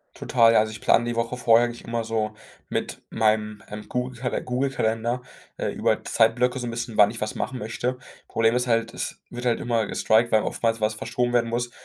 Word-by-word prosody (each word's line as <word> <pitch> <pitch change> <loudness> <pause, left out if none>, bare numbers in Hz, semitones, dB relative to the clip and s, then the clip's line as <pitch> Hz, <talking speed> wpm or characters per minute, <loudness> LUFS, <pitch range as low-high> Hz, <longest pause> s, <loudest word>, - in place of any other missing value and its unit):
Total, 115 -2 +4
ja, - - +6
also 110 0 +1
ich 110 - -8
plane 120 - +3
die 120 0 -2
Woche 115 +2 -1
vorher 120 -1 +5
eigentlich 120 0 -7
immer 115 0 -2
so 110 -1 -2 0.3
mit - - -3
meinem, 110 -1 0
ähm, 105 0 -8
Google-Kalen 125 0 -3
Google-Kalender, 125 -2 -1 0.3
äh, - - -1
über - - 0
Zeitblöcke 125 +3 +2
so 120 - -4
'n - - -2
bisschen, 115 -1 -5
wann 105 -1 +7
ich 115 +2 -7
was 110 - -2
machen 130 - -3
möchte. 120 +3 -3 0.3
Problem 115 +1 +2
ist 125 0 0
halt, 115 -1 +1
es - - -5
wird 120 +1 -6
halt 120 -1 +2
immer 115 -3 0
gestriked, 115 +2 +2
weil 110 - +4
oftmals 115 -1 -1
was 110 0 +1
verschoben 120 +3 -2
werden 120 -1 +2
muss, 120 +1 -2
115 Hz, 210 wpm, -25 LUFS, 110-120 Hz, 0.3 s, wann